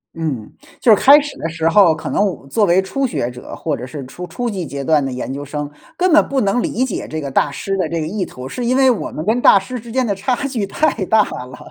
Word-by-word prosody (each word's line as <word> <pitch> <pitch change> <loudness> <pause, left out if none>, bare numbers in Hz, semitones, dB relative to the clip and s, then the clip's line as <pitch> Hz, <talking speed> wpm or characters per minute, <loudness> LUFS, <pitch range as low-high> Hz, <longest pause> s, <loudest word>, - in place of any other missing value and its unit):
嗯， 150 -10 -4 0.3
就 225 -3 +6
是 - - -5
开 285 +2 +8
始 290 -1 -6
的 165 - -3
时 165 0 -1
候， 170 -1 +5
可 - - -6
能 205 - +2
我 195 -4 -2
们 - - -17
作 210 +9 +2
为 175 0 +4
初 270 +8 -1
学 135 - -2
者 125 0 -9
或 155 -3 -2
者 - - -8
是 135 0 -7
初 180 +7 -8
初 240 +9 -4
级 195 -6 -3
阶 140 -2 -5
段 150 0 +3
的 135 - -3
研 125 +1 -4
究 140 +1 -5
生， 145 0 -5 0.3
根 365 -1 +2
本 315 - +7
不 275 - 0
能 205 +4 +1
理 250 +2 0
解 245 - -4
这 155 - -4
个 140 -3 -5
大 140 - +2
师 195 +7 -3
的 185 - -1
这 170 - -2
个 155 - -2
意 195 +3 -2
图， 130 -7 -8
是 245 - -5
因 250 +2 +1
为 265 -1 +5
我 235 - -3
们 155 - -6
跟 225 +4 +1
大 - - +7
师 220 +6 -4
之 230 +1 -11
间 260 +1 +1
的 205 - 0
差 225 +6 -1
距 230 -7 -2
太 260 -1 0
大 220 +2 +4 0.2
了。 125 0 -11
190 Hz, 310 characters per minute, -18 LUFS, 150-240 Hz, 0.3 s, 开